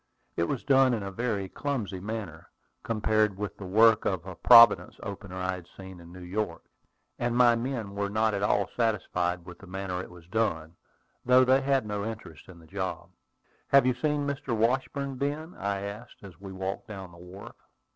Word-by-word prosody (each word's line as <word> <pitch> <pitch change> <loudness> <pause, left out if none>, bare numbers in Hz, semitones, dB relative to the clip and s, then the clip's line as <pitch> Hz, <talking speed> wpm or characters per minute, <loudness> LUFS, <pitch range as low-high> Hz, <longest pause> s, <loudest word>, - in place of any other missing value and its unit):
It 85 - +1
was 130 +7 -3
done 135 -2 +4
in 105 - -4
a 100 - -5
very 105 -3 -2
clumsy 115 -7 -4
manner, 100 -5 -6 0.3
compared 110 -3 +1
with 105 -1 -4
the 95 - -8
work 110 +3 +5
of 95 -3 -2
a 95 - -7
Providence 115 +1 +7
opener 100 -1 -7
I 95 0 -2
had 90 -2 -9
seen 95 -2 -10
in 85 0 -13
New 90 0 -11
York; 95 -1 -3 0.6
and 120 0 -1
my 120 -1 +6
men 115 -4 -4
were 100 0 -2
not 110 +1 +1
at 100 - -2
all 100 -1 +2
satisfied 90 -6 -1
with 90 -1 -11
the 100 - -13
manner 90 -1 -4
it - - -9
was 90 -2 -14
done, 85 -5 -2 0.5
though 125 +1 +5
they 130 +1 +4
had 135 -3 +1
no 105 -1 -3
interest 110 -3 -8
in 90 - -12
the 85 - -16
job. 90 -1 -5 0.6
"Have 140 -2 +5
you 130 - +3
seen 145 +3 -1
Mr. 135 -4 -2
Washburn, 130 +4 0
Ben?" 150 +5 -3
I 100 0 -3
asked, 105 +4 -8
as 95 -2 -13
we 100 -1 -8
walked 95 +4 -5
down 95 -4 -8
the 85 - -15
wharf. 90 +3 -11
100 Hz, 195 wpm, -28 LUFS, 95-120 Hz, 0.6 s, Providence